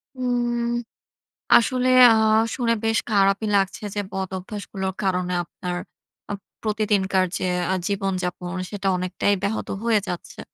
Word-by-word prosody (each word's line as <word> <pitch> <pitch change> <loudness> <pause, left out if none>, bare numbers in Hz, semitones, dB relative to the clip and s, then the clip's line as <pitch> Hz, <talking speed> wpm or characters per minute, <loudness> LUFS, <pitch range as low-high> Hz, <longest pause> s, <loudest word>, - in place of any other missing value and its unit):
উম 240 -1 0 0.9
আসলে 255 +2 +2 0.2
আ - - +5 0.4
শুনে 235 -2 +1
বেশ 225 0 +2
খারাপই 200 +1 +3
লাগছে 195 +1 0
যে 205 - -1
বদঅভ্যাসগুলোর 190 0 -4
কারণে 180 -1 0
আপনার 180 +1 -5 0.5
আ - - -1 0.3
প্রতিদিনকার 205 -3 +1
যে - - -3 0.3
আ - - +2
জীবনযাপন, 185 -2 -2
সেটা 200 -2 -2
অনেকটাই 185 +3 0
ব্যাহত 200 +2 -2 0.2
হয়ে 230 -2 +4
যাচ্ছে। 175 -1 -6
200 Hz, 120 wpm, -23 LUFS, 190-220 Hz, 0.9 s, আ